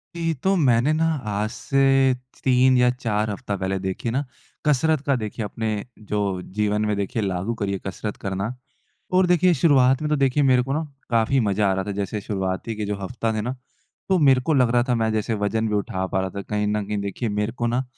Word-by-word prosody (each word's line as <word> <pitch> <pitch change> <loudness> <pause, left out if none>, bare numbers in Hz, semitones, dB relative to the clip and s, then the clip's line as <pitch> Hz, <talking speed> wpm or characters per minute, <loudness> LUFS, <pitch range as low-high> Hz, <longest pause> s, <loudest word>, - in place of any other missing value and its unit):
जी। 165 -1 0
तो 195 +1 +3
मैंने 130 -4 +3
ना, 160 +1 +1 0.2
आज 105 +1 -1
से 135 0 +3 0.2
च - - -23
3 130 0 +4
या 125 0 +5
4 110 -4 -1
हफ़्ता 105 0 -3
पहले 95 +1 -1
देखिए 95 +5 -3
ना, 135 +4 0 0.4
कसरत 150 +1 +2
का 140 - +2
देखिए, 110 -2 -4
अपने 110 +2 -3 0.3
जो 100 -3 -2 0.2
जीवन 105 0 +1
में 105 -1 0
देखिए, 100 +3 -2
लागू 95 +2 -1
करी 100 -1 0
है, 95 - -3
कसरत 105 +2 -5
करना। 100 +4 -3 0.6
और 185 0 +4
देखिए, 180 0 +4
शुरुआत 135 -3 +4
में 150 - -1
तो 150 - +3
देखिए, 140 +1 +2
मेरे 130 -2 +4
को 135 +2 -3
ना 155 +3 0 0.3
काफ़ी 115 +3 +2
मज़ा 105 -2 +1
आ - - +3
रहा 95 0 -1
था। 105 - -3
जैसे 100 +1 -2
शुरुआती 95 +2 -3
के 105 - -3
जो 105 0 -2
हफ़्ता 115 +3 -2
थे 110 - -1
ना? 125 +4 -3 0.5
तो 190 -1 +3
मेरे 135 -5 +5
को 160 - +3
लग 125 -4 +4
रहा 120 0 +3
था, 125 - +3
मैं 110 -1 +1
जैसे 110 +1 -1
वज़न 110 +2 0
भी 105 - -1
उठा 95 -2 -1
पा 95 - -1
रहा 95 0 -2
था, 100 +2 -6
कहीं 105 +1 -2
न 105 0 0
कहीं 105 0 -2
देखिए, 100 +4 -3
मेरे 105 +1 -1
को 120 - 0
ना 120 +3 0
115 Hz, 230 wpm, -23 LUFS, 105-130 Hz, 0.6 s, या